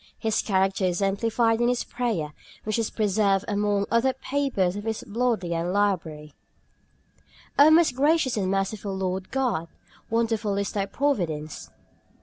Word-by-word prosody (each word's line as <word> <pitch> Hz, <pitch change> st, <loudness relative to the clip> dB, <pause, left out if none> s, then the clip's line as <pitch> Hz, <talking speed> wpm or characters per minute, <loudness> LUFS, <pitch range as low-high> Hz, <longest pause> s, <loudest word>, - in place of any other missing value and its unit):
His 220 Hz, -2 st, 0 dB
character 190 Hz, -1 st, +1 dB
is 180 Hz, -1 st, +1 dB
exemplified 225 Hz, +4 st, +1 dB
in 240 Hz, -, +3 dB
this 245 Hz, 0 st, +1 dB
prayer, 215 Hz, -12 st, -2 dB, 0.3 s
which 215 Hz, +1 st, -1 dB
is 225 Hz, -, 0 dB
preserved 200 Hz, -2 st, +1 dB
among 205 Hz, -1 st, 0 dB
other 235 Hz, +3 st, +3 dB
papers 260 Hz, -9 st, -1 dB
of 205 Hz, +1 st, -6 dB
his 220 Hz, -1 st, -3 dB
in 205 Hz, -, -13 dB
the 230 Hz, -, -5 dB
Bodleian 180 Hz, -8 st, 0 dB
Library: 165 Hz, -7 st, -1 dB, 1.3 s
"O 290 Hz, +2 st, +9 dB
most 315 Hz, -5 st, +5 dB
gracious 285 Hz, -1 st, +2 dB
and 195 Hz, -3 st, -1 dB
merciful 195 Hz, 0 st, -2 dB
Lord 190 Hz, 0 st, -3 dB
God, 245 Hz, -12 st, -1 dB, 0.4 s
wonderful 225 Hz, -3 st, 0 dB
is 200 Hz, 0 st, -1 dB
Thy 200 Hz, -1 st, -2 dB
providence. 175 Hz, -, -2 dB
205 Hz, 145 wpm, -25 LUFS, 190-235 Hz, 1.3 s, O